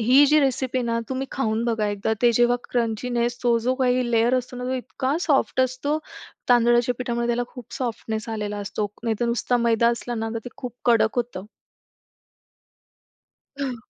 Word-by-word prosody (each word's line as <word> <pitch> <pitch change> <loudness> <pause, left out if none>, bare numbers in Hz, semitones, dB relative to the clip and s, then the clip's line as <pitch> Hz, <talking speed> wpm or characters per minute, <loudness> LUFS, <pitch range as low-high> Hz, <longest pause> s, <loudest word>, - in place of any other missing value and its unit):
ही 255 +6 +6
जी 305 +2 +5
recipe 260 -2 0
आहे 245 - -1
ना 230 0 0
तुम्ही 265 +1 -2
खाऊन 225 -3 0
बघा 225 -3 0
एकदा, 205 +2 -1
ते 240 -1 +5
जेव्हा 240 +1 +3
क्रंचीनेस 240 +1 -1
तो 240 -1 +3
जो 250 +3 0
काही 250 -2 +1
लेयर 235 +2 +3
असतो 250 0 -7
ना, 250 - -5
तो 255 +1 -1
इतका 260 +2 -2
सॉफ्ट 275 -5 +2
असतो 260 +4 0 0.5
तांदळाच्या 240 0 +4
पिठामुळे, 235 -2 -1
त्याला 240 +1 0
खूप 250 -3 -12
सॉफ्टनेस 230 -2 -3
आलेला 210 -2 -3
असतो. 205 +1 -2 0.2
नाहीतर 230 0 0
नुसता 235 +1 +1
मैदा 235 -1 +3
असला 240 +1 -2
ना 225 -1 -2
तर - - -1
ते - - -5
खूप 245 -2 -7
कडक 230 -1 +3
होतं. 235 -6 -2 2.2
हं. 255 -3 -2
240 Hz, 170 wpm, -24 LUFS, 230-255 Hz, 2.2 s, ही